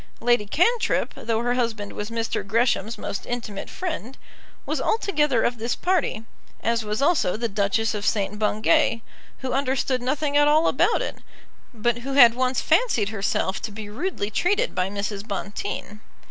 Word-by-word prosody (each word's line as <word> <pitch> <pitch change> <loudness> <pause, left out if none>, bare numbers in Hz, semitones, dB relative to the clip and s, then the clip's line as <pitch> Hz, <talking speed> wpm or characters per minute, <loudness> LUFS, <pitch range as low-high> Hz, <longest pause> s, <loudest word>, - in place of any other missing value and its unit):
Lady 240 -3 +2
Cantrip, 445 - +1
though 225 0 -1
her 245 0 +1
husband 230 -4 -2
was 210 +1 -5
Mr. 230 0 -2
Gresham's 220 0 +1
most 200 -1 -5
intimate 225 -5 -5
friend, 310 -8 -5 0.5
was - - -2
altogether 300 - +1
of 240 -1 0
this 235 +2 -1
party, 345 -11 0 0.4
as 230 0 +1
was 210 +4 -2
also 290 - +2
the 235 +1 -1
Duchess 210 +2 0
of 210 -1 -4
St. 205 0 0
Bungay, 225 +3 +2 0.4
who 260 -1 -3
understood 260 -1 0
nothing 285 +3 -1
at 290 0 +5
all 310 +2 +4
about - - +2
it, - - -5 0.5
but 240 0 0
who 270 +3 -5
had 245 -4 +8
once 255 +1 0
fancied 245 - +2
herself 195 -2 -1
to 220 - -5
be 205 0 -8
rudely 230 - -3
treated 410 - +1
by 185 +1 0
Mrs. 205 +1 -4
Bonteen. 205 +1 -5
230 Hz, 160 wpm, -24 LUFS, 210-275 Hz, 0.5 s, had